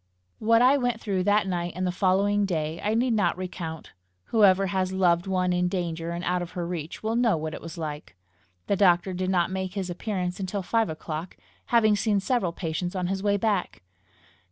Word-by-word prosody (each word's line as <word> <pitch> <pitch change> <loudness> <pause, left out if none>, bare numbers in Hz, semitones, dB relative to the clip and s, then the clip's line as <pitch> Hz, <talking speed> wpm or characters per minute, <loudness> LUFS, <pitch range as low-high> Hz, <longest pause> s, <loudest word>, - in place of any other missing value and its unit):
What 230 +2 +4
I 265 +3 +6
went 245 -3 -1
through 190 -5 -1
that 205 0 +3
night 175 -2 -2
and 185 +1 -2
the 180 - 0
following 200 +2 +2
day, 160 -4 -2
I 210 +2 +1
need 240 +1 +2
not 185 -6 +1
recount. 170 -3 -6 0.4
Whoever 195 -3 +5
has 185 0 -1
loved 180 -2 +2
one 185 -1 +1
in 180 0 +1
danger 170 -3 -3
and 170 +1 -4
out 180 0 0
of 175 0 -6
her 175 -2 -3
reach, 170 0 -5
will 220 +1 0
know 235 -6 +3
what 155 0 -4
it - - -7
was 165 +1 -8
like. 150 - -6 0.5
The 200 - +1
doctor 185 -1 +3
did 185 +1 -2
not 180 -1 +1
make 190 0 -3
his 190 -3 -3
appearance 180 -1 -3
until 195 +1 -3
five 225 +3 +1
o'clock, 160 +2 -6 0.3
having 220 -3 +4
seen 205 0 +1
several 195 -4 0
patients 175 +2 -3
on 180 -1 -1
his 190 0 -2
way 205 0 +2
back. 200 - -1
185 Hz, 205 wpm, -26 LUFS, 175-205 Hz, 0.5 s, I